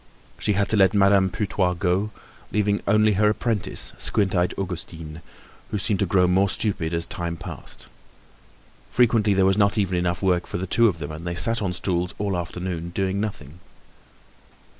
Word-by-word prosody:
She 105 Hz, -, +1 dB
had 100 Hz, 0 st, +1 dB
to 110 Hz, -, +3 dB
let 95 Hz, +1 st, +4 dB
Madame 100 Hz, -1 st, +4 dB
Putois 95 Hz, -2 st, -1 dB
go, 95 Hz, +3 st, 0 dB, 0.4 s
leaving 105 Hz, -1 st, +1 dB
only 105 Hz, +1 st, +4 dB
her 105 Hz, +2 st, +3 dB
apprentice, 110 Hz, -1 st, -2 dB
squint 100 Hz, -3 st, +1 dB
eyed 90 Hz, -1 st, +1 dB
Augustine, 85 Hz, -4 st, -6 dB, 0.5 s
who 105 Hz, -, -2 dB
seemed 100 Hz, 0 st, 0 dB
to 100 Hz, -, +1 dB
grow 90 Hz, +1 st, +3 dB
more 95 Hz, +2 st, +3 dB
stupid 95 Hz, -7 st, -2 dB
as 85 Hz, -1 st, -1 dB
time 85 Hz, -1 st, -4 dB
passed. -, -, -9 dB, 1.0 s
Frequently 110 Hz, -4 st, +3 dB
there 95 Hz, 0 st, +4 dB
was 95 Hz, +2 st, +3 dB
not 100 Hz, +1 st, +3 dB
even 95 Hz, -3 st, +1 dB
enough 90 Hz, +1 st, -1 dB
work 90 Hz, -2 st, +1 dB
for -, -, -4 dB
the 90 Hz, -, -3 dB
two 115 Hz, +5 st, +4 dB
of 95 Hz, -6 st, 0 dB
them 75 Hz, -2 st, -6 dB
and 80 Hz, +3 st, -7 dB
they 85 Hz, -, -2 dB
sat 115 Hz, +6 st, 0 dB
on 100 Hz, -3 st, -1 dB
stools 90 Hz, 0 st, -2 dB
all 100 Hz, -2 st, -1 dB
afternoon 85 Hz, 0 st, -4 dB
doing 95 Hz, +2 st, -1 dB
nothing. 85 Hz, -7 st, -6 dB
95 Hz, 180 wpm, -24 LUFS, 90-105 Hz, 1.0 s, let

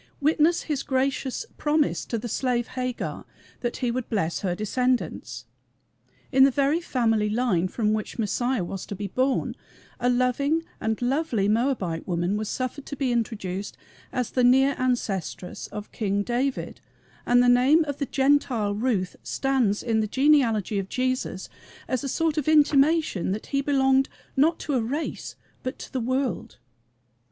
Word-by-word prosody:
Witness 315 Hz, +3 st, +3 dB
his 295 Hz, -4 st, -2 dB
gracious 265 Hz, -, -1 dB
promise 300 Hz, 0 st, +1 dB
to 230 Hz, -, -2 dB
the 235 Hz, +2 st, -5 dB
slave 240 Hz, 0 st, -1 dB
Hagar 255 Hz, -1 st, -4 dB, 0.4 s
that 240 Hz, -1 st, -3 dB
he 240 Hz, -, +1 dB
would 250 Hz, 0 st, -3 dB
bless 175 Hz, -7 st, -1 dB
her 180 Hz, -3 st, -1 dB
descendants. 210 Hz, -, -1 dB, 0.9 s
In 265 Hz, 0 st, +6 dB
the 275 Hz, -, +7 dB
very 280 Hz, +5 st, +1 dB
family 225 Hz, -8 st, +1 dB
line 210 Hz, -6 st, +1 dB
from 215 Hz, +2 st, 0 dB
which 215 Hz, -1 st, -3 dB
Messiah 240 Hz, +1 st, 0 dB
was 185 Hz, +2 st, -6 dB
to 200 Hz, -, -5 dB
be 200 Hz, +2 st, -5 dB
born 255 Hz, +7 st, 0 dB, 0.5 s
a 245 Hz, 0 st, +2 dB
loving 255 Hz, +6 st, +1 dB, 0.2 s
and 220 Hz, 0 st, -1 dB
lovely 250 Hz, -6 st, +1 dB
Moabite 215 Hz, -7 st, 0 dB
woman 175 Hz, +2 st, 0 dB
was 215 Hz, 0 st, -3 dB
suffered 260 Hz, +2 st, -4 dB
to 285 Hz, -, -5 dB
be 270 Hz, -2 st, 0 dB
introduced 205 Hz, -5 st, -3 dB, 0.3 s
as 250 Hz, -3 st, -2 dB
the 250 Hz, -, +1 dB
near 265 Hz, +3 st, +5 dB
ancestress 205 Hz, -8 st, -2 dB
of 210 Hz, 0 st, -8 dB
King 205 Hz, -2 st, -1 dB
David, 255 Hz, +4 st, -2 dB, 0.5 s
and 245 Hz, 0 st, +5 dB
the -, -, +3 dB
name 260 Hz, +6 st, +5 dB
of 285 Hz, -2 st, -5 dB
the 280 Hz, -, -1 dB
Gentile 265 Hz, -6 st, +2 dB
Ruth 205 Hz, -4 st, -1 dB
stands 260 Hz, -7 st, 0 dB
in 225 Hz, -2 st, +1 dB
the 215 Hz, -, 0 dB
genealogy 235 Hz, -6 st, +3 dB
of 195 Hz, 0 st, -5 dB
Jesus 255 Hz, -7 st, -2 dB, 0.4 s
as 255 Hz, 0 st, -1 dB
a 275 Hz, -, -2 dB
sort 325 Hz, +2 st, +1 dB
of 295 Hz, -, -4 dB
intimation 300 Hz, -, +3 dB
that 215 Hz, -, -5 dB
he 275 Hz, -, +3 dB
belonged 270 Hz, -1 st, +3 dB, 0.3 s
not 315 Hz, +5 st, +3 dB
to 295 Hz, -, -2 dB
a 255 Hz, -, +2 dB
race 280 Hz, +8 st, -4 dB, 0.3 s
but 255 Hz, -, -4 dB
to -, -, -10 dB
the 260 Hz, -, 0 dB
world. 255 Hz, +2 st, -2 dB
250 Hz, 160 wpm, -25 LUFS, 215-275 Hz, 0.9 s, the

